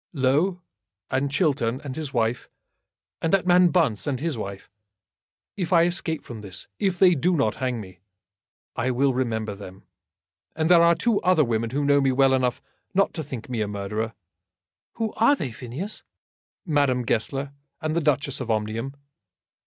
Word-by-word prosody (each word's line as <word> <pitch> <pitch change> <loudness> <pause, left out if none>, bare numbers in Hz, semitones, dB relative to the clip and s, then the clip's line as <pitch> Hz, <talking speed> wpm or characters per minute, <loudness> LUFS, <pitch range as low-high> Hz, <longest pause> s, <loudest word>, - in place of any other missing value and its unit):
"Low, 155 +7 +1 0.5
and 135 +2 +1
Chiltern, 140 -5 +1
and 135 -3 -5
his 155 -4 -5
wife; 115 -1 -1 0.7
and 165 - 0
that 195 -2 +3
man 180 0 +6
Bunce, 155 - +1
and 135 -3 -1
his 160 0 -2
wife. 100 -3 -6 0.9
If 185 -3 -3
I 170 -2 +6
escape 170 -2 -1
from 115 -3 -8
this, 95 -3 -6
if 190 -2 0
they 180 0 +6
do 175 +4 +1
not 110 -8 +1
hang 125 -2 -1
me, 95 -4 -11 0.8
I 125 +3 0
will 130 +2 +2
remember 110 -4 -1
them. 95 -1 -11 0.7
And 160 +2 +1
there 170 -1 +8
are 170 0 +5
two 205 +6 +1
other 180 -4 +4
women 115 -2 -1
who 140 +4 -1
know 140 0 +4
me 135 -1 +3
well 135 +1 +4
enough 125 -2 0 0.3
not 195 +1 +3
to 160 - -4
think 130 -3 -7
me 120 -4 -2
a 105 - 0
murderer." 105 +2 -3 0.8
"Who 225 -2 -3
are 230 +6 +5
they, 135 - -4
Phineas?" 130 - -6 0.6
"Madame 140 -6 +2
Goesler, 135 +5 -1 0.3
and 155 -2 -2
the 170 - +2
Duchess 140 -3 0
of 120 - -5
Omnium." 110 +5 -2
135 Hz, 170 wpm, -25 LUFS, 115-165 Hz, 0.9 s, there